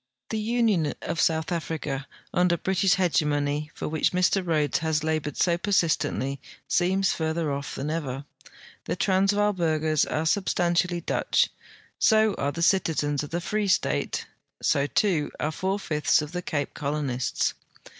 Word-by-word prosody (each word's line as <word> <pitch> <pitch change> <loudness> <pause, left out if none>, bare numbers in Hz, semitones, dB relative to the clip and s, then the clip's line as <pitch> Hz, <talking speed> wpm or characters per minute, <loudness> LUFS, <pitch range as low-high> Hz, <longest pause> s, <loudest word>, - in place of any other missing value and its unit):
The 220 - -1
union 215 -8 +1
of 165 0 -3
South 160 +1 +1
Africa 155 -5 -3 0.3
under 180 -1 +3
British 190 +1 +2
hegemony, 150 -4 0
for - - -4
which 155 +3 0
Mr 180 +1 +2
Rhodes 155 -4 +1
has 160 -1 0
labored 155 -2 -2
so 170 -1 +2
persistently, 160 -8 0 0.3
seems 190 +1 +2
further 160 -1 -1
off 140 +1 -5
than 145 +3 -3
ever. 140 -4 -3 0.6
The - - -2
Transvaal 200 +2 +2
burghers 155 -4 +1
are 155 +1 -2
substantially 175 -1 +1
Dutch; - - +1 0.5
so 220 -1 +4
are 140 - 0
the 170 +3 -3
citizens 155 -6 +2
of 150 - -6
the 170 - -2
Free 210 +3 -1
State; 70 - 0 0.3
so, 140 0 +2
too, 170 -4 +1
are 155 - -1
four 190 +5 -1
fifths 150 -5 +1
of 150 - -7
the 180 0 -3
Cape 145 -4 -3
Colonists. 140 -4 -1
160 Hz, 145 wpm, -26 LUFS, 150-185 Hz, 0.6 s, so